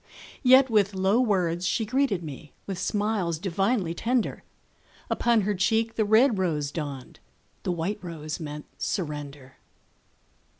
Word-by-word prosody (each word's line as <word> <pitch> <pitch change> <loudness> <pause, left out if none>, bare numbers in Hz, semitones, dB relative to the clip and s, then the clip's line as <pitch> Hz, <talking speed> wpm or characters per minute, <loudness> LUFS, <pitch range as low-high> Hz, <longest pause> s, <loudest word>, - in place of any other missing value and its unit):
Yet 260 +1 +7
with 205 -4 +2
low 190 +4 +2
words 180 -7 +1
she 220 - 0
greeted 245 -6 0
me, 150 -1 -9
With 190 -2 -4
smiles 205 -6 0
divinely 195 +1 0
tender; 235 +6 -1 0.7
Upon 235 -2 +3
her 205 +1 0
cheek 225 +4 +1
the 220 - +1
red 220 +1 +4
rose 150 -6 -1
dawned, 145 -5 -6 0.4
The - - -2
white 175 +5 -2
rose 155 -3 -5
meant 150 -2 -6
surrender. 145 -6 -4
190 Hz, 130 wpm, -26 LUFS, 160-220 Hz, 0.7 s, Yet